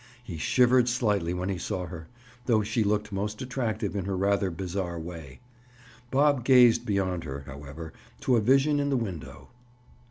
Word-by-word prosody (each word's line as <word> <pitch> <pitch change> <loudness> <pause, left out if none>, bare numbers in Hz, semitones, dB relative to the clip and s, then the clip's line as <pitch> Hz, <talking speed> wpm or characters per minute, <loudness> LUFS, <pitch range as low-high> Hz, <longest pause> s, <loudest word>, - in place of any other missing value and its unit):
He 85 -9 -7
shivered 125 +6 +4
slightly 105 -8 0
when 90 +1 -2
he 95 -2 -2
saw 95 0 -3
her, 80 -1 -9 0.4
though 110 -4 +3
she 110 +2 0
looked 105 0 0
most 105 +2 -3
attractive 115 -6 -3
in 95 -3 -2
her 95 -1 -2
rather 100 0 +1
bizarre 90 0 -4
way. 80 - -9 0.7
Bob 140 -1 +3
gazed 125 -2 +5
beyond 95 -4 0
her, 70 -2 -6
however, 70 +3 -9 0.3
to 130 - +2
a 115 - +3
vision 135 +6 +3
in 140 0 0
the 135 - +2
window. 95 - -6
100 Hz, 165 wpm, -27 LUFS, 90-120 Hz, 0.7 s, gazed